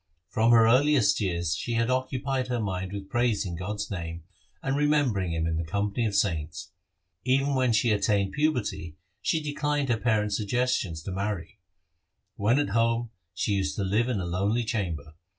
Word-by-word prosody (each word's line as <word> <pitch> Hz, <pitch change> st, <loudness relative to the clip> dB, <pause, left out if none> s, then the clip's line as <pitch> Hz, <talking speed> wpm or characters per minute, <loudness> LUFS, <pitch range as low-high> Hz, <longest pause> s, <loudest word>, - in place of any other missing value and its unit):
From 110 Hz, +1 st, +2 dB
her 115 Hz, -1 st, +7 dB
earliest 125 Hz, -3 st, +4 dB
years 85 Hz, -4 st, 0 dB
she 120 Hz, +8 st, -3 dB
had 115 Hz, +2 st, +1 dB
occupied 130 Hz, 0 st, -1 dB
her 125 Hz, -1 st, -1 dB
mind 95 Hz, -3 st, -3 dB
with 100 Hz, -1 st, -6 dB
praising 110 Hz, -6 st, 0 dB
God's 100 Hz, +4 st, -4 dB
name 85 Hz, -3 st, -5 dB, 0.4 s
and 135 Hz, 0 st, 0 dB
remembering 140 Hz, -, +2 dB
Him 80 Hz, 0 st, -1 dB
in 80 Hz, -1 st, -1 dB
the 85 Hz, -, -1 dB
company 100 Hz, +7 st, -1 dB
of 100 Hz, -, -3 dB
saints. 80 Hz, -6 st, -1 dB, 0.5 s
Even 135 Hz, +2 st, +2 dB
when 130 Hz, -2 st, +2 dB
she 110 Hz, +1 st, +3 dB
attained 100 Hz, -1 st, +1 dB
puberty 125 Hz, -, -1 dB, 0.2 s
she 160 Hz, -, 0 dB
de 150 Hz, -1 st, -3 dB
clined 145 Hz, -2 st, 0 dB
her 120 Hz, -, +2 dB
parents' 105 Hz, -3 st, +1 dB
suggestions 105 Hz, -7 st, -1 dB
to 95 Hz, -, -5 dB
marry. 100 Hz, 0 st, -4 dB, 0.8 s
When 110 Hz, +5 st, +2 dB
at 145 Hz, -, +1 dB
home, 115 Hz, +2 st, +1 dB, 0.2 s
she 105 Hz, -, -1 dB
used 95 Hz, -7 st, 0 dB
to 100 Hz, -, -1 dB
dwell 115 Hz, +6 st, +1 dB
in 115 Hz, -5 st, 0 dB
a 90 Hz, -, -3 dB
lonely 100 Hz, +7 st, 0 dB
chamber. 85 Hz, -9 st, -3 dB
105 Hz, 175 wpm, -27 LUFS, 95-125 Hz, 0.8 s, her